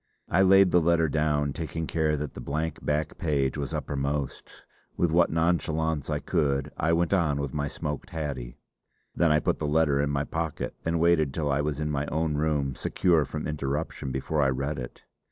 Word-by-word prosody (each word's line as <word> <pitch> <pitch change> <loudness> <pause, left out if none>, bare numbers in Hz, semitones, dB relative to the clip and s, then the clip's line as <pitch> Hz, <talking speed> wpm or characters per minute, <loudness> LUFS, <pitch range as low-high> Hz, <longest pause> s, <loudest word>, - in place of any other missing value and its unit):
I 90 - +3
laid 95 -1 +6
the 90 - +5
letter 80 0 +3
down, 75 -2 +1
taking 80 +1 -4
care 80 -1 0
that 75 0 -4
the - - -8
blank 75 +4 -3
back 75 +1 -1
page 70 -5 0
was 70 -2 -3
uppermost; 70 0 -3 0.3
with 85 -2 +2
what 85 +1 +4
nonchalance 80 -2 0
I 75 - 0
could 75 -4 0
I 80 - +1
went 85 +2 +2
on 80 -7 +2
with 70 -3 -3
my 75 -1 -1
smoked 75 +1 -5
haddie. 70 -7 -5 0.6
Then 85 -1 +3
I 75 - +4
put - - -1
the 75 - -1
letter 75 -2 +3
in 70 - 0
my 70 -1 0
pocket 80 0 -3
and 85 0 0
waited 80 -5 +3
till 75 -3 0
I 70 +1 +2
was 75 -1 -2
in 75 -1 -1
my 70 0 -1
own 80 0 0
room, 75 -3 0
secure 85 +1 +2
from 75 +3 -5
interruption, 75 -1 -3
before 75 +4 -1
I 70 - +3
read 70 +2 -2
it. - - -8
75 Hz, 195 wpm, -27 LUFS, 70-80 Hz, 0.6 s, laid